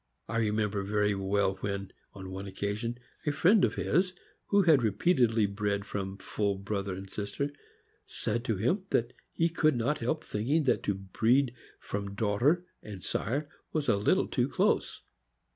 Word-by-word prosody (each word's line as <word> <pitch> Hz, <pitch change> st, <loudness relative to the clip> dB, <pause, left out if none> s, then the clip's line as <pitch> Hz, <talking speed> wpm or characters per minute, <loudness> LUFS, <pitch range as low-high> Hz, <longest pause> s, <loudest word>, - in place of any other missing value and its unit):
I 115 Hz, -, -2 dB
remember 105 Hz, -2 st, +1 dB
very 105 Hz, +1 st, +1 dB
well 95 Hz, 0 st, +1 dB
when, 100 Hz, -1 st, -4 dB, 0.2 s
on 95 Hz, -1 st, -8 dB
one 95 Hz, +1 st, -5 dB
occasion, 105 Hz, +5 st, -3 dB, 0.3 s
a -, -, +4 dB
friend 185 Hz, +7 st, +4 dB
of -, -, +2 dB
his, 185 Hz, +1 st, +1 dB, 0.3 s
who 200 Hz, -1 st, +4 dB
had 160 Hz, -6 st, +6 dB
repeatedly 115 Hz, -, +3 dB
bred 100 Hz, 0 st, -1 dB
from 95 Hz, -1 st, -4 dB
full 100 Hz, 0 st, -1 dB
brother 100 Hz, -1 st, -3 dB
and 95 Hz, +1 st, -7 dB
sister, 105 Hz, +9 st, -3 dB, 0.6 s
said 120 Hz, +2 st, -2 dB
to 115 Hz, -, +1 dB
him 175 Hz, -, 0 dB
that 120 Hz, +1 st, +1 dB, 0.2 s
he 165 Hz, -, +2 dB
could 160 Hz, -3 st, +2 dB
not 125 Hz, +6 st, 0 dB
help 150 Hz, +7 st, -1 dB
thinking 135 Hz, +10 st, 0 dB
that 130 Hz, -, +2 dB
to 100 Hz, -, +1 dB
breed 115 Hz, +7 st, +2 dB, 0.3 s
from 100 Hz, 0 st, -4 dB
daughter 120 Hz, -, +2 dB, 0.2 s
and 100 Hz, -4 st, -9 dB
sire 140 Hz, +7 st, -1 dB, 0.3 s
was 155 Hz, -2 st, 0 dB
a 115 Hz, -, +4 dB
little 100 Hz, -, +2 dB
too -, -, 0 dB
close. -, -, +1 dB
105 Hz, 160 wpm, -30 LUFS, 100-140 Hz, 0.6 s, had